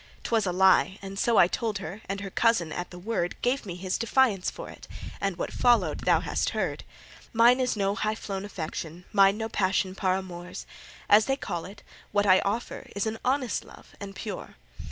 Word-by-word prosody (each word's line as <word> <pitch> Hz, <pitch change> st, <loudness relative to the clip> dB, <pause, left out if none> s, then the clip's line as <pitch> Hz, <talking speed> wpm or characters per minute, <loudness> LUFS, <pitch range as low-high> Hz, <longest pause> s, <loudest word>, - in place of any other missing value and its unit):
'T -, -, -5 dB
was 220 Hz, -4 st, +2 dB
a -, -, +1 dB
lie, 190 Hz, +1 st, +4 dB
and 195 Hz, 0 st, -6 dB
so 235 Hz, +1 st, +2 dB
I 175 Hz, -, +7 dB
told 220 Hz, +2 st, -2 dB
her, 195 Hz, +3 st, -7 dB
And 200 Hz, 0 st, -3 dB
her 195 Hz, -1 st, -6 dB
cousin 225 Hz, -9 st, +2 dB
at 175 Hz, +3 st, -4 dB
the 180 Hz, -, -10 dB
word 180 Hz, -2 st, -2 dB
Gave 250 Hz, -2 st, 0 dB
me 175 Hz, -, -5 dB
his 185 Hz, +1 st, -3 dB
defiance 230 Hz, -5 st, +2 dB
for -, -, -8 dB
it; -, -, -12 dB, 0.3 s
And 195 Hz, -3 st, -1 dB
what -, -, -4 dB
followed 240 Hz, -1 st, +2 dB
thou -, -, +4 dB
hast -, -, -1 dB
heard. -, -, -2 dB, 0.5 s
Mine 240 Hz, +3 st, +6 dB
is 250 Hz, -3 st, 0 dB
no 200 Hz, -1 st, +1 dB
high 215 Hz, +1 st, -1 dB
flown 195 Hz, -3 st, -5 dB
affection, 170 Hz, -2 st, -6 dB
Mine 195 Hz, 0 st, +5 dB
no 220 Hz, 0 st, -2 dB
passion 190 Hz, -3 st, 0 dB
par 185 Hz, -1 st, +1 dB
amours 180 Hz, -2 st, -7 dB, 0.4 s
As 210 Hz, +1 st, +6 dB
they 270 Hz, -, +1 dB
call 170 Hz, -10 st, -4 dB
it 200 Hz, +2 st, -12 dB, 0.3 s
what 205 Hz, 0 st, +2 dB
I 185 Hz, -1 st, +6 dB
offer 215 Hz, +4 st, -3 dB
Is 200 Hz, -, -1 dB
an 220 Hz, 0 st, -3 dB
honest 255 Hz, -2 st, 0 dB
love, -, -, -16 dB
and 195 Hz, -1 st, -8 dB
pure. 205 Hz, -3 st, -6 dB
200 Hz, 205 wpm, -27 LUFS, 185-225 Hz, 0.5 s, I